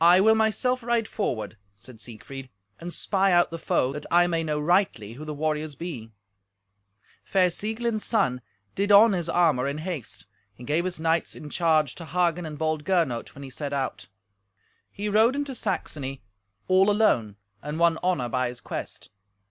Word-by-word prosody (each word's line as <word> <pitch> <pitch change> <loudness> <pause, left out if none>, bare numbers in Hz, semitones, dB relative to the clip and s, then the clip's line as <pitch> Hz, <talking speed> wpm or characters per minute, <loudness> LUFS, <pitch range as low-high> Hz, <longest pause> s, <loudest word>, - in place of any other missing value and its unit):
"I 175 +2 +7
will 220 +3 +6
myself 220 +4 +1
ride 235 -1 0
forward," 110 - -3 0.2
said 115 +3 -13
Siegfried, 130 +5 -9 0.3
"and 175 +1 -6
spy 195 +1 +1
out 175 -1 +4
the 165 - -5
foe, 130 -3 0
that 150 0 -7
I 175 0 +5
may 165 -2 0
know 150 -1 -1
rightly 150 - +1
who 150 +6 -9
the 155 - -5
warriors 155 0 -2
be." 130 -9 -7 1.1
Fair 185 -2 +2
Sieglind's 220 +3 -2
son 125 - +1 0.3
did 200 +1 0
on 205 +2 +8
his 170 -3 -2
armour 160 -7 +2
in 140 +1 -3
haste. 155 - -6 0.3
He 125 - -12
gave 155 +7 0
his 180 -3 -4
knights 165 +1 0
in 150 -1 -9
charge 155 -5 +2
to 165 - -9
Hagen 170 +1 0
and 150 -1 -7
bold 155 -1 -1
Gernot 165 -10 0
when 140 - -9
he 135 - -9
set 145 +1 -5
out. 130 -10 -3 0.8
He 205 +1 -5
rode 220 +5 +4
into 285 -1 -3
Saxony 135 - -4 0.4
all 190 +2 +4
alone, 125 - +2 0.3
and 150 +2 -5
won 170 -1 +3
honour 180 -9 0
by 125 +1 0
his 120 0 -7
quest. - - -7
165 Hz, 175 wpm, -26 LUFS, 140-190 Hz, 1.1 s, on